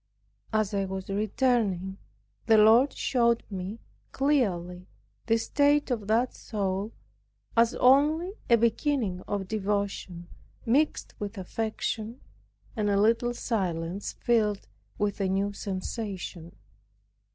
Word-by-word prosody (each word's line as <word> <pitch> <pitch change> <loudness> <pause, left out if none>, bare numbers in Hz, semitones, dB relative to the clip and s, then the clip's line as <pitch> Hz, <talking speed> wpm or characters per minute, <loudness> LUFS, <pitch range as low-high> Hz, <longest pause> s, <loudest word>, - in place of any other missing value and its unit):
As 215 -2 0
I 195 -1 0
was 190 0 -6
returning, 205 -3 0 0.5
the 225 -1 +6
Lord 225 +6 +6
showed 235 -2 +1
me 190 +3 -5 0.3
clearly 185 -11 0 0.4
the 225 0 +4
state 285 +4 +2
of 215 -5 -2
that 235 +4 +2
soul, 200 0 -3 0.6
as 230 +1 +4
only 300 +8 +4 0.2
a 235 - +7
beginning 230 -4 0
of 200 -2 -2
devotion 200 -4 -2 0.4
mixed 280 +6 +1
with 205 +1 -5
affection 220 +4 -3 0.6
and 210 -3 0
a 200 0 +2
little 230 +3 +2
silence, 185 -5 -2
filled 215 -4 0 0.3
with 205 0 -1
a 190 - +1
new 200 +2 0
sensation. 190 -4 -5
215 Hz, 110 wpm, -28 LUFS, 195-235 Hz, 0.6 s, a